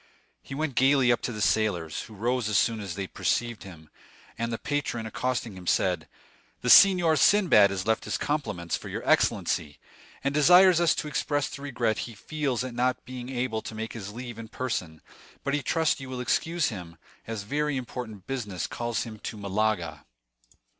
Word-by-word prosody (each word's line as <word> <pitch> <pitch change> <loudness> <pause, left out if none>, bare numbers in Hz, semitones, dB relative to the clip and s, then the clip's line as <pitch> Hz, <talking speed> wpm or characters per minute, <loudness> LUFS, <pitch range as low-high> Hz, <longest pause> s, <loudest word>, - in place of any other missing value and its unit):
He 135 - -8
went 155 -1 -2
gayly 130 -1 +4
up 120 - +1
to - - -3
the 105 -2 -2
sailors, 95 -5 0
who 110 - -11
rose 120 +2 0
as 105 - +2
soon 115 0 +2
as 95 -5 -5
they 95 0 -3
perceived 120 +4 -1
him; 80 -5 -12 0.4
and 115 +1 -3
the 115 - -2
patron, 140 -6 -2
accosting 120 -2 -2
him, 90 -1 -11
said: 90 -3 +1 0.5
"The 125 - +3
Signor 180 -5 +7
Sinbad 160 - +5
has 95 -1 -3
left 110 0 0
his - - -1
compliments 105 - -2
for - - -7
your - - -5
excellency, 75 -3 +1 0.5
and 140 0 0
desires 175 +4 +6
us 170 - +4
to - - -3
express 145 -1 -1
the 140 - -8
regret 120 -6 -1
he 115 - -11
feels 135 0 -2
at 130 -1 -5
not 125 +1 0
being 125 0 -7
able 120 -3 -2
to 110 - -8
take 110 +1 -5
his 105 -3 -7
leave 120 0 -7
in 115 - -7
person; 100 -10 -4 0.4
but 140 - -1
he 145 - +1
trusts 160 +4 +1
you 135 -1 -8
will 130 -1 -5
excuse 165 +6 0
him, 90 -7 -8 0.3
as 110 -3 -4
very 145 +5 -1
important 115 -5 -6
business 105 -9 -3
calls 120 -2 -2
him 110 -2 -9
to 110 - -6
Malaga." 100 -6 -1
120 Hz, 190 wpm, -27 LUFS, 105-135 Hz, 0.5 s, Signor